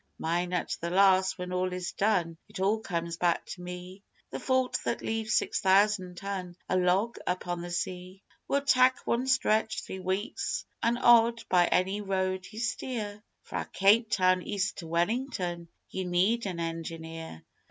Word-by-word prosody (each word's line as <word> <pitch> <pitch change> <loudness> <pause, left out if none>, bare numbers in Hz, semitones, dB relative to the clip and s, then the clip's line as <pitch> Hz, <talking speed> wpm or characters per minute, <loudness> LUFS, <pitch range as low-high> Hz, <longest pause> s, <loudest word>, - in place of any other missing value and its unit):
Mine 175 +2 -1
at 180 - -1
the 170 - -2
last 190 0 +4
when 180 0 -5
all 185 0 0
is 180 0 -4
done 185 -6 +1
it - - -8
all 200 +4 +2
comes 170 -5 -3
back 175 -1 +1
to 180 - -8
me, 180 +2 -8 0.3
The - - -4
fault 260 -1 +1
that 235 - -2
leaves 220 -1 -1
six - - +1
thousand 190 -2 +3
ton 190 -3 -5
a - - 0
log 185 +6 +2
upon 180 -1 -2
the 175 - -6
sea. 180 +2 -4 0.2
We'll 280 0 +1
tak' 255 -2 +5
one 245 +3 0
stretch 220 -4 +2
three 190 - -7
weeks 190 +7 -2 0.2
an' 235 +1 +2
odd 235 -1 +5
by 175 -1 +4
any 190 +3 +1
road 190 -1 -1
ye 215 - -11
steer 225 -3 -3 0.2
Fra' - - -5
Cape 215 +4 +4
Town 185 -1 +3
east 195 0 -2
to 165 - -7
Wellington 175 -1 -1 0.2
ye 190 - -3
need 190 +6 +1
an 180 -3 -4
engineer. 165 - -6
190 Hz, 165 wpm, -29 LUFS, 180-215 Hz, 0.3 s, tak